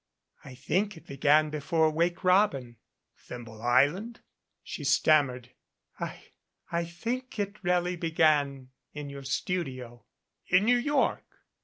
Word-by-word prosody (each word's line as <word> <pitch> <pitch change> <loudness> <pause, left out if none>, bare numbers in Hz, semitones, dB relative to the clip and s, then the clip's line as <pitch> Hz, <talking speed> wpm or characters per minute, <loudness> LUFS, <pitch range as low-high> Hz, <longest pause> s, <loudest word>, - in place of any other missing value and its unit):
"I 130 -2 -11
think 180 +9 -1
it - - -15
began 150 +2 +3
before 155 +1 +1
'Wake 170 +3 0
Robin'?" 180 - +2 0.4
"Thimble 115 -3 -10
Island?" 145 - +2 0.4
She 150 - -7
stammered. 140 -3 +2 0.5
"I - - -6 0.5
I 170 0 0
think 235 +9 -5
it 205 0 -4
really 180 0 +1
began 150 -5 +1 0.2
in 150 -1 -7
your 140 0 -8
studio." 130 -5 -4 0.4
"In 185 +3 +4
New 245 +2 +4
York?" 285 +2 +1
155 Hz, 120 wpm, -28 LUFS, 135-180 Hz, 0.5 s, In